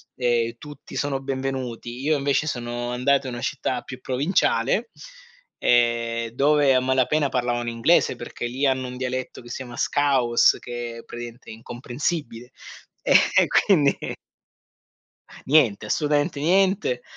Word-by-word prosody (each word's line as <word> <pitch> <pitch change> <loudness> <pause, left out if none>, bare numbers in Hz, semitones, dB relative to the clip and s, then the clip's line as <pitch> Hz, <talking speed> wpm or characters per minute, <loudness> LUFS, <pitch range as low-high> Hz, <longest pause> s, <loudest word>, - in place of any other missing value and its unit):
e 120 -2 0
tutti 145 +2 -12
sono 140 -2 -1
benvenuti, 130 -3 -4
io 150 +2 +2
invece 140 +2 0
sono 120 -2 -3
andato 135 +3 +1
in 125 - -5
una 120 - -6
città - - -2
più - - -9
provinciale, 160 - +1 0.7
ehm, 115 -1 +2
dove 140 +3 +3
a 130 - +4
malapena 130 +3 +1
parlavano 120 -2 -1
inglese 115 +9 +2
perché 120 - -6
lì 130 +4 -2
hanno 130 -1 +1
un 125 0 -7
dialetto 130 0 -4
che 120 - -13
si - - -5
chiama 120 -3 -8
scouse 135 -5 +3
che 120 -1 -7
praticamente 120 +1 -9
è - - -7
incomprensibile 120 +2 -4 0.6
e - - +3 0.2
e - - +5
quindi 150 -8 +3 1.5
niente, 110 -9 +3
assolutamente 145 +2 0
niente 185 - +2
130 Hz, 135 wpm, -23 LUFS, 120-145 Hz, 1.5 s, e